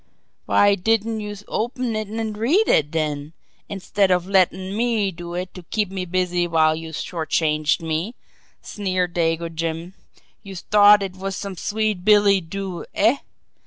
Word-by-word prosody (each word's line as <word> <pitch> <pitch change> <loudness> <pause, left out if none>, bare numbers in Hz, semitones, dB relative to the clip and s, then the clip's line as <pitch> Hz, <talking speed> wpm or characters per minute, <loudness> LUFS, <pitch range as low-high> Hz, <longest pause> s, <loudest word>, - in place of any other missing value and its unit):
"Why 205 0 +4
didn't 225 +3 0
youse 210 -1 -7
open 240 +1 -2
it 215 -1 -3
an' 220 0 -3
read 280 - +2
it, 150 -1 +3
den, 150 -1 -3 0.4
instead 195 0 0
of 180 -1 +2
lettin' 190 0 +1
me 225 -3 +1
do 175 0 -8
it 180 +1 -4
to 180 - -9
keep 205 +3 -2
me 190 -1 -4
busy 180 -1 0
while 160 -2 +3
youse 160 -1 -6
short 165 -3 -5
changed 155 0 +1
me?" 165 +8 -2 0.5
sneered 185 -3 -2
Dago 165 -1 0
Jim. 165 +2 -4 0.5
"Youse 195 -4 -9
t'ought 205 0 +6
it 190 -1 -5
was 195 0 -4
some 200 -1 -6
sweet 210 0 -2
billy 205 -1 +5
doo, 185 +1 -6
eh? 225 +7 +3
190 Hz, 160 wpm, -22 LUFS, 170-210 Hz, 0.5 s, t'ought